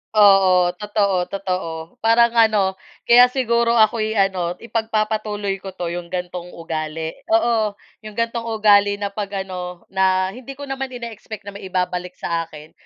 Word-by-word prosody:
Oo, 190 -4 +6
totoo, 200 -3 0
totoo, 185 -4 -3 0.3
parang 230 +1 +4
ano, 210 -5 +3 0.2
kaya 245 +1 +7
siguro 235 -2 +1
ako'y 220 0 +2
ano, 185 -3 +1
ipagpapatuloy 215 -3 -2
ko 190 0 -9
'to 175 -2 -3
'yong 175 0 -5
gantong 180 0 -5
ugali, 160 -1 -4 0.2
oo, 235 -11 +2 0.2
'yong 215 -1 -11
gantong 230 0 -2
ugali 205 -2 +4
na 200 0 -4
'pag 200 -1 -4
ano, 180 -2 -7
na, 190 0 +2
hindi 260 +5 -10
ko 285 - -9
naman 270 -2 -5
in-expect 225 -3 -8
na 200 - -8
maibabalik 180 -2 -3
sa 165 -1 -2
akin 155 -1 -13
200 Hz, 145 wpm, -21 LUFS, 180-225 Hz, 0.3 s, kaya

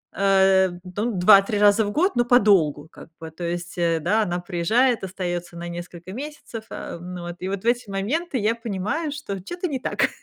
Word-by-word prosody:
э, 190 0 +4
ну, 205 +6 -3
2-3 195 +2 +5
раза 210 +1 +5
в 205 - -3
год, 360 - +1
но 240 - +3
подолгу 195 - +3
как - - -14
бы. 160 -1 -7
То 165 +2 -9
есть, 175 +1 -4
э, 170 -1 +1
да, 215 +8 +2
она 175 -2 -2
приезжает, 205 +8 +1
остаётся 175 -2 -4
на 170 0 -6
несколько 175 +1 -8
месяцев. 270 -3 -7
Э, - - -6
ну 180 0 -7
вот, 175 0 -6
и 185 - -4
вот 195 -1 -4
в - - -13
эти 240 -2 +1
моменты 255 - -2
я 220 +1 +1
понимаю, 230 - -3
что 280 -10 -5
чё-то 350 - -4
не 270 -4 -3
так. - - 0
195 Hz, 200 wpm, -23 LUFS, 175-235 Hz, -, 2-3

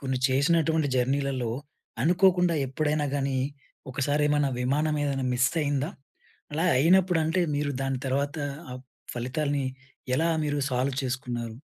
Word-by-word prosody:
కొన్ని 130 -2 -1
చేసినటువంటి 160 +2 +2
జర్నీలలో 130 -1 0 0.5
అనుకోకుండా 180 +1 +4
ఎప్పుడైనా 150 +2 0
గానీ, 135 -1 0 0.6
ఒకసారి 145 +2 0
ఏమైనా 145 -2 +2
విమానం 150 +4 +1
ఏదైనా 135 -2 -1
మిస్ 130 +1 +3
అయిందా? 145 +2 0 0.6
అలా 165 +3 +1
అయినప్పుడు 180 +2 +4
అంటే, 165 +4 +1 0.2
మీరు 145 0 0
దాని 135 -1 -1
తర్వాత 140 +3 -1 0.4
ఆ - - -5 0.4
ఫలితాల్ని 140 +3 -1 0.5
ఎలా 165 +1 +2 0.2
మీరు 145 -1 -1
సాల్వ్ 130 +1 0
చేసుకున్నారు? 120 -3 -3
145 Hz, 125 wpm, -27 LUFS, 130-155 Hz, 0.6 s, అనుకోకుండా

